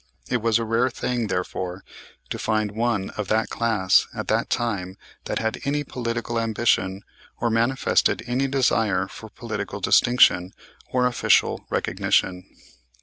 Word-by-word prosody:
It 125 - +1
was 115 -1 +3
a 115 - -2
rare 115 +3 +2
thing, 120 -2 -2
therefore, 90 0 -3 0.5
to - - -3
find 110 -2 0
one 110 -3 -1
of 105 -2 -5
that 110 +3 0
class 110 -5 +2
at - - -5
that - - +1
time 100 -6 -2 0.3
that - - -2
had 110 0 -2
any 145 +1 0
political 120 -3 -3
ambition 110 -4 0 0.4
or 120 - 0
manifested 115 0 +2
any 125 +3 0
desire 115 -7 +1
for - - -11
political - - -5
distinction 95 -7 +4 0.4
or 125 -1 +2
official 125 -1 +2
recognition. 90 -1 0
115 Hz, 140 wpm, -24 LUFS, 100-120 Hz, 0.5 s, distinction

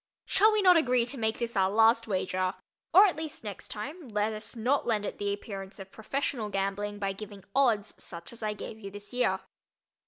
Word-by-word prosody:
Shall 425 +3 +5
we 430 -1 +2
not 365 -2 +8
agree 250 -6 +3
to 245 +3 -5
make 220 -1 0
this 235 -1 -3
our 190 -1 +3
last 225 +2 +4
wager—or 185 - +2
at 380 - +1
least, 310 -4 -5
next 205 -3 -7
time, 290 +9 -6
let 210 0 0
us 215 +2 -4
not 245 +5 +1
lend 215 -3 +1
it - - -5
the 205 0 0
appearance 195 -1 -6
of 195 -1 -10
professional 230 -1 -2
gambling 200 +1 -2
by 195 -1 -1
giving 205 -1 -9
"odds," 230 -6 +2
such 170 +5 -8
as 235 - -12
I 210 -1 -1
gave 220 +1 -8
you 200 -2 -7
this 205 +3 -9
year. 190 -6 +1
215 Hz, 200 wpm, -29 LUFS, 200-245 Hz, -, not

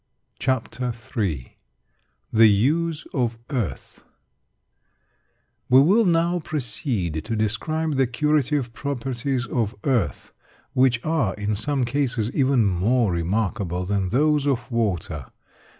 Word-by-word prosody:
CHAPTER 125 -1 -1 0.2
III 80 - -2 0.7
THE 110 0 +7
USE 150 +10 +1
OF 120 -4 0
EARTH 120 - -4 1.7
We 130 - +7
will 200 +11 +5
now 170 0 +2
proceed 110 - -2
to 115 - -3
describe 145 +8 -1
the 135 -1 +3
curative 145 -1 0
properties 130 -1 -2
of 115 -4 -1
earth, 115 - -1 0.4
which 125 -3 +2
are, 155 -11 +1
in 105 0 -2
some 135 +4 0
cases, 125 -3 -1
even 130 -4 +2
more 100 +4 +2
remarkable 90 +1 -1
than 100 -1 0
those 150 +4 +2
of 130 -2 -1
water. 90 - -1
120 Hz, 110 wpm, -23 LUFS, 105-140 Hz, 1.7 s, THE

